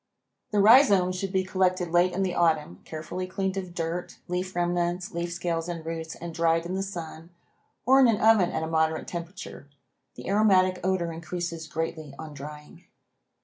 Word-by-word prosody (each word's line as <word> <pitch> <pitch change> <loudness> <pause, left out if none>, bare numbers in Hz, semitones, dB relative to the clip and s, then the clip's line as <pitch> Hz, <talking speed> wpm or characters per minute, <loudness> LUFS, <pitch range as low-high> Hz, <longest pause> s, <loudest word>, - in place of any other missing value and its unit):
The 210 - -1
rhizomes 200 -5 +6
should 190 +1 -3
be 190 -1 +1
collected 185 -2 0
late 175 +1 +4
in 195 +2 -1
the 185 -2 -1
autumn, 155 - +1
carefully 160 +4 -5
cleaned 190 +1 -2
of 185 -2 -5
dirt, 170 +1 -4
leaf 180 +1 -3
remnants, 175 0 -1
leaf 170 0 -3
scales 170 -1 -2
and 165 -2 -5
roots 165 0 -5
and 170 -1 -7
dried 165 0 +2
in 175 - -4
the 190 - -1
sun 170 -4 -7 0.6
or 265 +3 +6
in 260 - +7
an 225 -3 +2
oven 220 -5 +5
at 160 - -2
a - - -2
moderate 160 0 0
temperature. 170 -4 -7 0.5
The - - -9
aromatic 190 -2 +3
odor 180 -3 0
increases 165 0 -5
greatly 155 -2 -4
on 155 -1 -8
drying. 150 +1 -10
175 Hz, 175 wpm, -27 LUFS, 165-185 Hz, 0.6 s, in